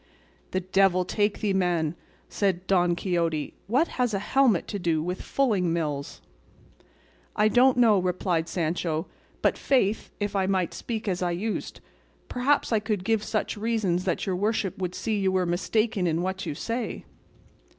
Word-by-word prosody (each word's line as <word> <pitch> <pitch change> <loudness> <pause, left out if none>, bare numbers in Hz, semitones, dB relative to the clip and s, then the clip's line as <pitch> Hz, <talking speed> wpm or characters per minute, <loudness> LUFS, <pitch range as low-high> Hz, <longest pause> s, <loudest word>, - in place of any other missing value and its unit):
"The 185 - -1
devil 185 0 +3
take 205 +2 0
thee, 205 -2 +1
man," 175 -4 +1 0.3
said 190 -3 -1
Don 180 -2 +3
Quixote; 170 -4 -1
"what 260 +10 +2
has 245 -4 -1
a 195 - -4
helmet 260 -9 +4
to 205 - -3
do 165 -3 +1
with 180 +2 -3
fulling 205 -11 +1
mills?" 150 -4 -3 1.1
"I 210 - +4
don't 245 +3 +4
know," 225 -5 +5
replied 180 -2 -1
Sancho, 165 -1 -1 0.4
"but, - - +2
faith, 225 -6 +1
if 205 -1 -2
I 190 -1 +1
might 185 -3 0
speak 225 -2 -5
as 185 -2 -1
I 180 - +1
used, 200 +6 -3 0.5
perhaps 260 +3 +1
I 220 - +4
could 210 -3 -2
give 220 0 +1
such 215 0 -2
reasons 205 -5 0
that 180 -3 -1
your 190 - -1
worship 205 -1 0
would 180 -1 -3
see 215 -2 -1
you 190 -1 +2
were 185 -1 +1
mistaken 195 +3 0
in 165 +1 0
what 190 +1 -3
you - - -3
say." 230 +8 -4
190 Hz, 165 wpm, -26 LUFS, 175-215 Hz, 1.1 s, know